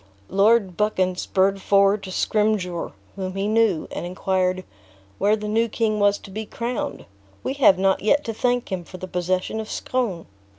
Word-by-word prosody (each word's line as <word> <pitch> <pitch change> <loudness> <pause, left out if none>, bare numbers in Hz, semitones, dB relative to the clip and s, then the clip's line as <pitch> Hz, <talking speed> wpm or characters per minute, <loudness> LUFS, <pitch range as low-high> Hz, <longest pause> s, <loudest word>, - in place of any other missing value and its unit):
Lord 200 -1 +3
Buchan 190 -3 +1
spurred 195 +1 +1
forward 200 +1 +3
to 190 - -8
Scrymgeour, 205 -4 0 0.2
whom 185 -1 -4
he 195 +1 -1
knew, 215 -6 +2
and - - -4
inquired, 185 +1 -1 0.6
"where 210 +2 +3
the 210 -1 -5
new 225 +2 +2
king 215 -1 0
was 205 0 +3
to 195 - -13
be 215 +3 -4
crowned? 250 +5 -4 0.4
We - - -1
have 195 -6 +7
not 190 0 +2
yet 280 +8 +3
to 225 - -3
thank 245 0 0
him 185 -2 -2
for 185 - -11
the 185 - -7
possession 185 +4 -1
of 220 - -6
Scone!" 225 -10 -2
200 Hz, 175 wpm, -23 LUFS, 185-220 Hz, 0.6 s, have